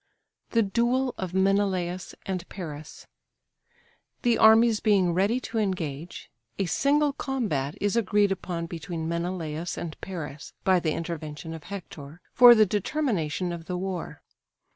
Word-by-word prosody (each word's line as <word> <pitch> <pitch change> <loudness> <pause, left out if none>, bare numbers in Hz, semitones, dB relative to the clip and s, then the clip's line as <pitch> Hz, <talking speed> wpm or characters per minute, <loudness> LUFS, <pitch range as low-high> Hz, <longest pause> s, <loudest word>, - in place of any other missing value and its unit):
THE 230 -1 +3
DUEL 240 +5 +1
OF 185 -1 -4
MENELAUS 190 -2 0
AND 185 -2 -4
PARIS. 155 -5 -8 1.2
The 240 -2 +4
armies 220 0 +6
being 190 -5 +3
ready 200 +7 +2
to 225 - -3
engage, 170 -6 -4 0.3
a 195 - 0
single 285 - +2
combat 210 - -2
is 205 +1 0
agreed 205 -2 +2
upon 175 -3 -3
between 165 -1 -5
Menelaus 170 -1 -3
and 160 -2 -5
Paris 145 -9 -7
(by 185 -1 +4
the 160 -3 -1
intervention 160 -1 -5
of 160 -2 -9
Hector) 160 -5 -9
for 245 -1 +9
the 215 -1 +6
determination 195 - -1
of 170 -1 -6
the 180 0 -3
war. 185 -2 -5
185 Hz, 135 wpm, -26 LUFS, 165-210 Hz, 1.2 s, for